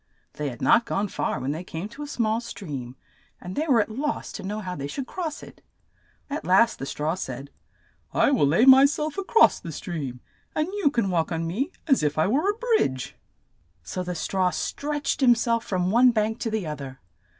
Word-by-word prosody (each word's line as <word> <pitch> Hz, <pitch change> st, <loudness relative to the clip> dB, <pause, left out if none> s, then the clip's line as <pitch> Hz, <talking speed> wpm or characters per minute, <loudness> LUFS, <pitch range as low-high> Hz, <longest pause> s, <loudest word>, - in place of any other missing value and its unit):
They 150 Hz, -1 st, -3 dB
had 120 Hz, -, -8 dB
not 235 Hz, -, +4 dB
gone 200 Hz, +1 st, -1 dB
far -, -, -2 dB
when 130 Hz, +2 st, -2 dB
they 160 Hz, +4 st, -4 dB
came 170 Hz, +2 st, -6 dB
to 275 Hz, +6 st, -11 dB
a 295 Hz, -, -5 dB
small 225 Hz, -5 st, 0 dB
stream, 140 Hz, -, -7 dB, 0.4 s
and 180 Hz, +1 st, -7 dB
they 310 Hz, +2 st, -1 dB
were 245 Hz, -6 st, +5 dB
at 210 Hz, -, -4 dB
loss 290 Hz, +6 st, -3 dB
to -, -, -7 dB
know 205 Hz, +2 st, -4 dB
how 185 Hz, -3 st, -5 dB
they 140 Hz, -2 st, -4 dB
should 260 Hz, -, -4 dB
cross 325 Hz, 0 st, -5 dB
it. -, -, -13 dB, 0.7 s
At 290 Hz, +2 st, -4 dB
last 195 Hz, +6 st, +4 dB
the 135 Hz, -, -4 dB
straw 150 Hz, +3 st, -1 dB
said, 140 Hz, -6 st, -6 dB, 0.6 s
"I -, -, +3 dB
will 245 Hz, -, +3 dB
lay 170 Hz, -, +4 dB
my 265 Hz, +1 st, +9 dB
self 300 Hz, +4 st, -1 dB
a -, -, -2 dB
cross 450 Hz, +4 st, +5 dB
the 165 Hz, -, -7 dB
stream, 145 Hz, -6 st, -5 dB, 0.4 s
and 310 Hz, +1 st, +1 dB
you 405 Hz, -8 st, +2 dB
can 230 Hz, -8 st, 0 dB
walk 165 Hz, -2 st, 0 dB
on 165 Hz, 0 st, -1 dB
me 235 Hz, -, -2 dB
as 275 Hz, -5 st, +3 dB
if 150 Hz, 0 st, 0 dB
I 155 Hz, -, +3 dB
were 285 Hz, -, +2 dB
a 415 Hz, -, -1 dB
bridge." 440 Hz, -, 0 dB, 0.7 s
So 185 Hz, -, -4 dB
the 180 Hz, 0 st, -4 dB
straw 185 Hz, +2 st, 0 dB
stretched 290 Hz, +8 st, -2 dB
him 245 Hz, -2 st, +6 dB
self 230 Hz, 0 st, 0 dB
from 185 Hz, -1 st, 0 dB
one 245 Hz, +3 st, +6 dB
bank 220 Hz, -1 st, 0 dB
to 230 Hz, -, -2 dB
the 220 Hz, -4 st, -2 dB
other. 140 Hz, -3 st, -6 dB
210 Hz, 215 wpm, -25 LUFS, 160-275 Hz, 0.7 s, my